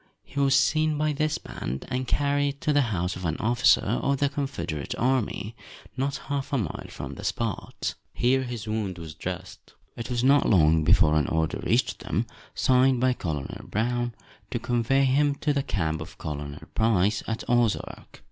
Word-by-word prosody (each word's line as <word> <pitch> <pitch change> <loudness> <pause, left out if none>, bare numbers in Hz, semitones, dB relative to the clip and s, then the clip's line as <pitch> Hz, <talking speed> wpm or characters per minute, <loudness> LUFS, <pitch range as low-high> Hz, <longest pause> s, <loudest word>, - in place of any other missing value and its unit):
He 140 - -6
was 135 -1 +4
seen 155 +2 +3
by 155 0 +1
this 155 +2 0
band, 65 +2 -6
and 130 0 -2
carried 145 +1 +1
to 150 - +1
the 145 - +4
house 90 -2 -1
of 90 - -7
an 80 -2 -1
officer 120 +2 +4
of 135 +6 +1
the 140 +1 +2
Confederate 85 - -3
army, 120 -3 0 0.4
not 135 +2 -1
half 140 0 -3
a 140 - +2
mile 110 - -3
from - - -7
the - - -9
spot. 115 -4 -2 0.2
Here 130 +2 +2
his 120 -5 -5
wound 105 -4 -2
was 80 -2 -8
dressed. 90 +3 -7 0.2
It 115 - -6
was 120 -1 0
not 140 +2 +5
long 80 -5 +5
before 75 0 +5
an 75 -3 +2
order 80 0 0
reached - - +1
them, - - -1 0.3
signed 130 0 +4
by 130 +1 +3
"Colonel 75 - -5
Brown," 120 +2 -1 0.3
to - - -2
convey 125 +3 +2
him 140 +2 +3
to 145 +1 0
the 140 - +1
camp 80 -10 -1
of 80 - -9
Colonel 75 -2 -5 0.2
Price, 105 -2 +2
at 115 0 -3
Ozark. 120 -3 0
120 Hz, 175 wpm, -26 LUFS, 90-140 Hz, 0.4 s, not